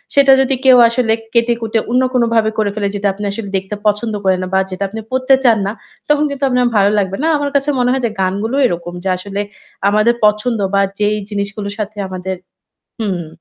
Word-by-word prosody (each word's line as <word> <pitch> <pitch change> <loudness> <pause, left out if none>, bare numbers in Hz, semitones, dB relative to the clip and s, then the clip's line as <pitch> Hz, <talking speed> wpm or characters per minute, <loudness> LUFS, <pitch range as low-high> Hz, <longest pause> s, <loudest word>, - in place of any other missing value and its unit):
সেটা 275 -1 +6
যদি 270 0 +1
কেউ 255 -1 +7
আসলে 235 -2 +1 0.2
কেটে-কুটে 230 -1 +1
অন্য 250 +1 +3
কোনভাবে 230 -3 +2
করে 210 -2 +1
ফেলে 205 -2 -1
যেটা 205 0 -1
আপনি 205 +2 -8
আসলে 200 -1 -6
দেখতে 195 +2 -5
পছন্দ 210 +2 0
করেন 190 -1 +2
না - - -4
বা 190 - +4
যেটা 185 +2 -3
আপনি 225 +2 -6
পড়তে 260 +1 +2
চান 230 -3 +5
না, - - -1 0.4
তখন 295 0 +3
কিন্তু 280 0 -6
আপনার 250 -1 +2
ভালো 200 +1 +4
লাগবে 195 0 -2
না। - - +2
আমার 285 0 -2
কাছে 280 +1 +1
মনে 245 0 +2
হয় 260 -1 -1
যে - - +1
গানগুলো 200 +7 -1
এরকম 175 -4 -2
যে 190 - -1
আসলে 200 +2 -4 0.5
আমাদের 215 +3 +3
পছন্দ 210 +2 +1
বা 200 - +3 0.2
যেই 210 0 +1
জিনিসগুলোর 200 0 -4
সাথে 210 0 -4
আমাদের 185 0 -5 0.7
হুম। 185 -6 -2
215 Hz, 200 wpm, -16 LUFS, 200-245 Hz, 0.7 s, কেউ